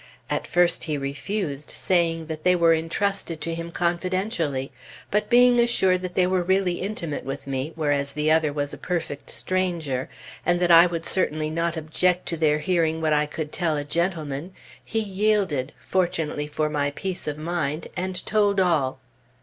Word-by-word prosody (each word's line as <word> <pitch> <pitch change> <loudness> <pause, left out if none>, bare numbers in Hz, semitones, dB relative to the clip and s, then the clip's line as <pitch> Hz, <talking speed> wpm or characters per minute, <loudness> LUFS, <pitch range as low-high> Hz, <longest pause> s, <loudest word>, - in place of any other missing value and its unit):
At - - -1
first 175 0 +2
he 155 -3 -1
refused, 140 +2 -3
saying 165 -3 +1
that 155 -1 -6
they 180 0 +4
were 170 -1 +5
entrusted 165 +1 -1
to 165 - -2
him 165 0 -5
confidentially; 175 - -1 0.4
but 210 +1 +1
being 245 0 +6
assured 190 -6 +3
that 185 -1 -5
they 185 - +4
were 185 0 +1
really 185 0 +1
intimate 180 -7 -4
with 135 +1 -5
me, 135 +2 -3
whereas 145 -3 0
the 150 +1 +1
other 160 -2 +3
was 145 -1 -3
a - - -8
perfect 165 -5 -4
stranger, 170 -8 -2 0.3
and 175 0 +2
that 175 -1 +3
I 170 +1 +9
would 170 -1 -4
certainly 155 -4 +1
not 165 +1 -1
object 175 +3 0
to 170 - -1
their 155 -1 +3
hearing 160 0 +1
what 160 -1 +1
I 150 0 +2
could 150 0 -5
tell 160 -3 0
a 145 - -2
gentleman, 165 0 -2 0.3
he 225 - -4
yielded, 200 -9 0
fortunately 155 0 -1
for 150 +1 -1
my 145 -1 0
peace 180 +5 -5
of 150 0 -2
mind, 155 -1 -2
and 185 0 -3
told 205 -2 +2
all. 155 -8 +2
165 Hz, 175 wpm, -24 LUFS, 150-185 Hz, 0.4 s, I